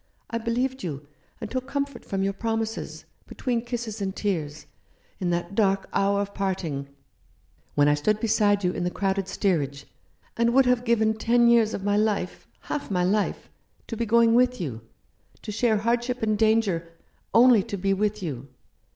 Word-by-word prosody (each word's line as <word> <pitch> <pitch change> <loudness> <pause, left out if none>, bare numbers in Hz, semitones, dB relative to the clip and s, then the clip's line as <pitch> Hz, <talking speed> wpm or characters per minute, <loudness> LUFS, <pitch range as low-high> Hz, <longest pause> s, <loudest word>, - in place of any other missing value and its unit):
I 230 - -1
believed 250 +3 -1
you, 150 -4 -5 0.3
and 220 -3 -6
took 255 0 -3
comfort 280 -2 -3
from 195 -1 -2
your 195 0 0
promises, 225 +1 -3 0.2
between 240 -3 -2
kisses 235 -3 -5
and 190 0 -2
tears, 155 -7 -3 0.5
in 180 - -1
that 175 +2 -2
dark 195 -2 +1
hour 200 0 +2
of 200 0 -5
parting, 170 -8 -2 0.9
when 145 0 +4
I 145 - +5
stood 205 +9 +1
beside 205 -2 +2
you 180 - +2
in 180 - -3
the 175 - 0
crowded 195 0 -1
steerage, 145 -9 -1 0.5
and 235 +1 +2
would 270 0 +6
have 250 -1 +2
given 220 -2 +3
ten 235 +2 +3
years 230 -2 +4
of 195 - -6
my 205 0 +1
life 210 -4 -1
— - - -36
half 290 - -4
my 180 -3 +1
life 200 +3 0 0.2
— - - -39
to 230 - -3
be 230 +1 -2
going 230 +1 +5
with 250 +1 +3
you, 130 -10 -4 0.6
to - - -5
share 220 +1 +2
hardship 240 +3 -1
and 215 -1 +2
danger 210 -6 +2 0.2
— - - -41
only 245 -4 +7
to 200 - -5
be 195 +1 +1
with 210 +1 -1
you. 140 -5 -5
210 Hz, 185 wpm, -25 LUFS, 190-235 Hz, 0.9 s, only